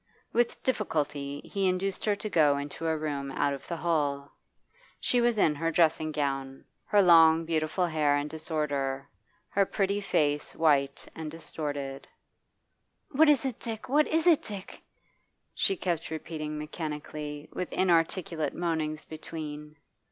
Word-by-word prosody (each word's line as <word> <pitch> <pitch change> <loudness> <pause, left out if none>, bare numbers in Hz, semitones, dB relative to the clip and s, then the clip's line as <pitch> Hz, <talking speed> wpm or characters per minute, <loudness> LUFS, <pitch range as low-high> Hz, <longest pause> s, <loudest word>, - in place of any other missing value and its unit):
With 240 0 +1
difficulty 145 - -1
he 195 -2 -1
induced 185 +1 -1
her 210 -1 +2
to 205 - -5
go 150 -7 +4
into 145 +3 -4
a 160 -1 +1
room 145 -3 -3
out 140 +1 +1
of 140 - -8
the 170 - -3
hall. 145 -4 -1 0.6
She 245 - +2
was 240 -1 +2
in 160 -7 +4
her 165 +3 -1
dressing 160 -1 +2
gown, 135 -2 -3 0.2
her 205 -1 +4
long 165 -2 +7
beautiful 160 +2 0
hair 150 -3 +2
in 145 +1 -2
disorder, 145 -4 -2 0.4
her 200 - +3
pretty 200 +1 0
face 150 -6 0
white 140 -4 +2
and 160 -1 -6
distorted. 145 -4 -5 1.0
'What 300 +3 +5
is 290 -2 +4
it, 255 -4 -3
Dick? 225 +1 -6
what 295 +3 +4
is 320 +1 +1
it, 335 -4 +6
Dick?' 200 -3 -8 0.7
she 390 - +1
kept 170 - -2
repeating 155 -1 -5
mechanically, 150 -1 -5
with 180 - -4
inarticulate 165 -2 +1
moanings 160 -3 -2
between. 150 -1 -7
160 Hz, 145 wpm, -29 LUFS, 145-185 Hz, 1.0 s, long